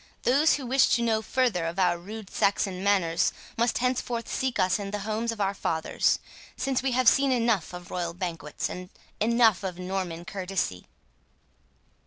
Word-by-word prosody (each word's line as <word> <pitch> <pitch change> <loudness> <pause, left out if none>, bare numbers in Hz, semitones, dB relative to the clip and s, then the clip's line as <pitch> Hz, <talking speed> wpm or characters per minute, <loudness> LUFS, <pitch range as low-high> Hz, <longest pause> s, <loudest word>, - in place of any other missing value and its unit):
Those 285 +6 +4
who 275 - -5
wish 260 +2 +4
to 235 - 0
know 220 -2 +2
further 220 -9 0
of 170 +2 -5
our 180 -2 +3
rude 200 +4 -9
Saxon 195 -2 0
manners 185 -5 +2 0.2
must 235 +1 +1
henceforth 245 -2 -1
seek 260 -2 -1
us 185 +2 +2
in 200 -1 -4
the 205 0 -4
homes 220 +2 -1
of 225 - -7
our 200 -1 +1
fathers, 160 -4 0 0.4
since 270 -2 0
we 260 -1 0
have 255 0 +2
seen 275 +2 +5
enough 230 -9 +1
of 180 0 -9
royal 170 -2 -3
banquets, 165 -5 -4
and 180 0 -7 0.3
enough 225 -2 +4
of 185 -2 -4
Norman 180 -2 -4
courtesy." 185 - -3
200 Hz, 170 wpm, -27 LUFS, 180-235 Hz, 0.4 s, seen